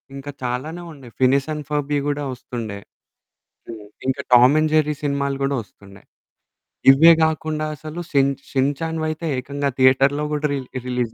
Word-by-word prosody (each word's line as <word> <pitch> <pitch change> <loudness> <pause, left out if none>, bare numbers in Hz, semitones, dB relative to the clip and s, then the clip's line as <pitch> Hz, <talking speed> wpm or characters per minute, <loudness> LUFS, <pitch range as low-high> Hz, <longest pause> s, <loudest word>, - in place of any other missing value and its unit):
ఇంకా 140 +1 -7
చాలానే 140 +8 -4
ఉన్నాయి 130 -6 -14
'ఫినిష్ 135 +2 +3
అండ్ 150 -1 -6
ఫర్బి' 145 -1 -1
కూడా 145 0 -2
వస్తుండే. 115 -4 -7 0.9
హ్మ్. 110 -2 -8 0.2
ఇంకా 130 - 0
'టామ్ 125 +4 +7
అండ్ 155 0 +1
జెర్రీ' 150 -1 +2
సినిమాలు 140 -1 -1
కూడా 140 0 0
వస్తుండే. 100 0 -18 0.9
ఇవే 160 +5 +7
కాకుండా 155 -1 -2
అసలు 155 +3 -8
షిన్ 140 -1 +3 0.2
'షిన్ 135 +1 +1
చాన్‌' 160 0 -2
వైతే 155 +1 -4
ఏకంగా 140 +2 -3
థియేటర్‌లో 135 +3 +4
కూడా 150 0 -1
రిలి 130 -2 -5
రిలీజ్ 125 -2 -2
140 Hz, 150 wpm, -21 LUFS, 130-150 Hz, 0.9 s, టామ్